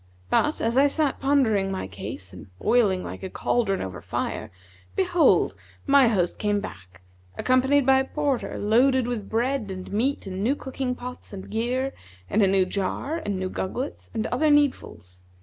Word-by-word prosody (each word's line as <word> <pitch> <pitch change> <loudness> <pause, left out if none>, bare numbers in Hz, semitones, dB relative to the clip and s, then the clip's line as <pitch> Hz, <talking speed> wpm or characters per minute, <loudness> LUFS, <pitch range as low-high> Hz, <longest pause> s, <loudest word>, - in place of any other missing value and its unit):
But, 300 - +2
as 230 +3 +2
I 285 - +6
sat 285 -1 0
pondering 230 -9 +2
my 190 - -3
case 95 0 -7
and 90 - -11
boiling 210 - +2
like - - -7
cauldron 200 -5 0
over 95 -2 -6
fire, - - -3 0.5
behold, 360 -3 +3 0.3
my 275 -3 +6
host 185 -6 0
came 205 -1 +1
back, 90 - -10 0.3
accompanied 265 +2 +3
by 265 0 +5
a 265 - 0
porter 285 -3 -2
loaded 250 +4 +3
with 235 -5 -4
bread 240 0 0
and 185 0 -7
meat 255 +7 0
and 190 0 -4
new 260 +6 +2
cooking 265 -2 -3
pots 250 -3 -9
and 190 -1 -8
gear 250 +5 -1 0.4
and 215 - +3
a 195 - +5
new 190 -1 +3
jar 200 - -2
and 205 - -3
new 185 0 -2
gugglets 250 +9 -4
and 225 -1 -2
other 310 0 +1
needfuls. 265 - 0
235 Hz, 165 wpm, -25 LUFS, 195-270 Hz, 0.5 s, I